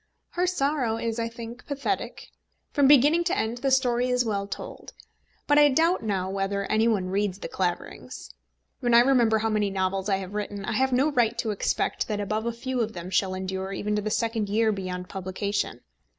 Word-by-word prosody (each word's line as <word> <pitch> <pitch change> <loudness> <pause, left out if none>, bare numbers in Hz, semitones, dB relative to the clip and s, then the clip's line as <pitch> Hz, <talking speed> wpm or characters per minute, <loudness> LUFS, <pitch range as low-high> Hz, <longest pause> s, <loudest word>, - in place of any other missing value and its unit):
Her 360 +1 0
sorrow 275 -9 0
is, 230 0 -2
I 230 - 0
think, 235 +1 -9
pathetic. 285 +7 -3 0.4
From 285 -3 +4
beginning 295 +5 +6
to 365 +3 0
end 230 +2 -1
the 270 +2 0
story 250 -2 +2
is 250 0 +2
well 200 -2 -1
told. - - -8 0.5
But 290 0 +4
I 295 0 +7
doubt 330 +6 +2
now 195 -4 -1
whether 195 +1 -1
any 220 +1 +3
one 195 -5 +1
reads 200 -1 0
The - - -6
Claverings. 180 -2 -4 0.5
When 240 -1 +2
I 235 - +9
remember 240 -4 +4
how 225 +1 0
many 210 -2 +1
novels 190 +1 -1
I 195 - +3
have 190 0 -7
written, 205 -1 -4
I - - -2
have 265 0 +2
no 270 +5 +3
right 240 -5 +2
to 220 - -1
expect 205 - -1
that 210 -2 -2
above 215 +2 -2
a - - +1
few 250 +2 -3
of 220 -1 -2
them 175 +1 -7
shall 190 -1 +1
endure 190 +1 -4
even 210 +2 -2
to 210 - 0
the 215 - -2
second 225 -1 -1
year 220 +2 +2
beyond 185 -2 -4
publication. 195 +2 -3
220 Hz, 205 wpm, -26 LUFS, 200-250 Hz, 0.5 s, I